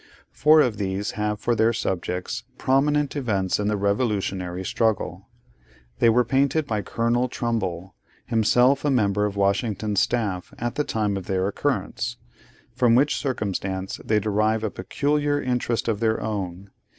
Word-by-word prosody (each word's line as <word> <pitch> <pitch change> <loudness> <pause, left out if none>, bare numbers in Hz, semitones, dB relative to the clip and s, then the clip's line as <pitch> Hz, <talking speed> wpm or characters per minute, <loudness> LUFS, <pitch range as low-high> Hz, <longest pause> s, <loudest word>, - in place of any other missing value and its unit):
Four 155 +1 +5
of 120 -7 +1
these 100 +1 -2
have 105 0 -2
for 120 - +1
their 115 +1 +3
subjects 90 -3 -3
prominent 145 +2 +1
events 100 -10 0
in 105 - 0
the 105 0 +1
revolutionary 100 -3 -1
struggle. 110 +2 -1 0.7
They 115 - +5
were 120 +2 +3
painted 140 +5 +1
by 110 -5 -1
Colonel 120 +4 0
Trumbull, 95 -8 -3 0.3
himself 125 +4 +3
a 150 - +2
member 105 -5 +2
of 100 - -6
Washington's 100 +1 0
staff 100 -7 -1
at 120 0 -2
the 150 - 0
time 105 -6 -1
of 95 - -7
their 95 0 0
occurrence; 120 +1 -2 0.6
from 125 -2 +3
which 140 +2 +3
circumstance 95 -7 -3
they 110 -1 +2
derive 110 +1 +1
a 110 - -1
peculiar 145 +8 0
interest 125 -3 -1
of 110 -3 0
their 110 -1 +1
own. 95 -3 -4
110 Hz, 150 wpm, -24 LUFS, 100-125 Hz, 0.7 s, Four